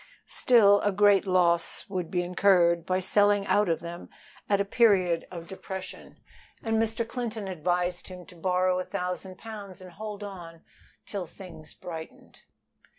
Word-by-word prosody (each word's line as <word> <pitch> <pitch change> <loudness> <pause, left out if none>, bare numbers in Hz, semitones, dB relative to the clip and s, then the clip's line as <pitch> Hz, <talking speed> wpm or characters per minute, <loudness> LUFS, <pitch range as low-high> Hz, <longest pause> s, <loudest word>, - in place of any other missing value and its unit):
Still 205 -5 +5
a 205 - +1
great 200 0 +4
loss 170 -2 +2
would 185 -4 -4
be 180 -1 0
incurred 175 -2 +3
by 185 - +1
selling 205 +1 +3
out 205 -2 +2
of 165 - 0
them 170 +1 -8 0.4
at 200 -1 +3
a 200 - +1
period 195 -6 +2
of 170 -2 -9
depression, 190 0 -8 0.5
and 225 -1 +1
Mr. 225 +1 -1
Clinton 225 -4 -4
advised 180 0 -2
him 180 -1 -10
to 180 - -15
borrow 185 +1 +1
a - - -2
thousand 180 0 -5
pounds 205 -4 -9
and 185 -1 -12
hold 210 +2 -7
on 170 -5 -9 0.4
till 195 -4 -5
things 165 -3 -12
brightened. 160 -2 -10
185 Hz, 150 wpm, -27 LUFS, 175-205 Hz, 0.5 s, Still